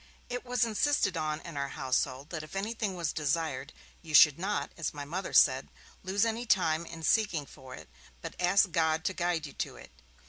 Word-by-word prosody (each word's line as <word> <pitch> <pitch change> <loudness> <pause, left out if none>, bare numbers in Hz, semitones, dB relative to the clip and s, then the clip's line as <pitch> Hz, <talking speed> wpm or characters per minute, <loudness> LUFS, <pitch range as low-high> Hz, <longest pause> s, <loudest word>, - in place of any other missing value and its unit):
It 245 0 -4
was 245 -2 +1
insisted 225 - +1
on 155 -1 -2
in 170 -3 -9
our 140 0 -1
household 130 +2 -2
that 165 -3 -4
if 155 +5 -11
anything 210 0 -2
was 170 -3 -2
desired, 150 -2 -2 0.3
you 155 -2 -3
should 150 0 +8
not, 200 +3 -2
as 165 -3 -4
my 145 -1 -5
Mother 180 +6 -4
said, - - +5 0.3
'lose 195 +3 +1
any 230 +2 -2
time 170 -5 +2
in 165 -1 -9
seeking 180 -7 +2
for 130 -2 -12
it, - - -12 0.3
but - - -7
ask 185 +1 +3
God 160 0 +1
to 190 - 0
guide 175 -3 -1
you 140 - -9
to - - -4
it'. - - -13
170 Hz, 200 wpm, -30 LUFS, 155-200 Hz, 0.3 s, should